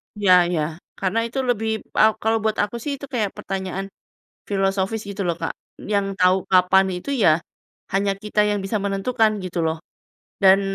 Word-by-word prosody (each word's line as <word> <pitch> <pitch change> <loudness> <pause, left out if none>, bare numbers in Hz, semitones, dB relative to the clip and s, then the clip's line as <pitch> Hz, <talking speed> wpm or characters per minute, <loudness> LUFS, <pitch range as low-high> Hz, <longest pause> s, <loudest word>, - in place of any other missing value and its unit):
Ya 185 -4 +5
ya, 160 -2 -2 0.2
karena 195 +3 -1
itu 265 +3 -3
lebih 225 -3 -1 0.2
a 220 0 +6
kalau 225 +1 +2
buat 220 0 0
aku 210 +3 -3
sih 285 +5 -4
itu 280 - -9
kayak 215 -5 -1
pertanyaan 195 0 -4 0.6
filosofis 195 +2 0
gitu 200 -1 -3
loh 170 - +1
Kak, - - -1 0.4
yang 200 -1 +2
tau 185 +1 +3
kapan 185 +1 +4
itu 180 +10 -6
ya 170 - +3 0.5
hanya 195 +1 +1
kita 210 0 0
yang 205 -1 0
bisa 210 +3 -1
menentukan 205 +3 +1
gitu 180 -1 -4
loh. 160 0 -1 0.6
Dan, 195 +1 +7
195 Hz, 170 wpm, -22 LUFS, 185-220 Hz, 0.6 s, Dan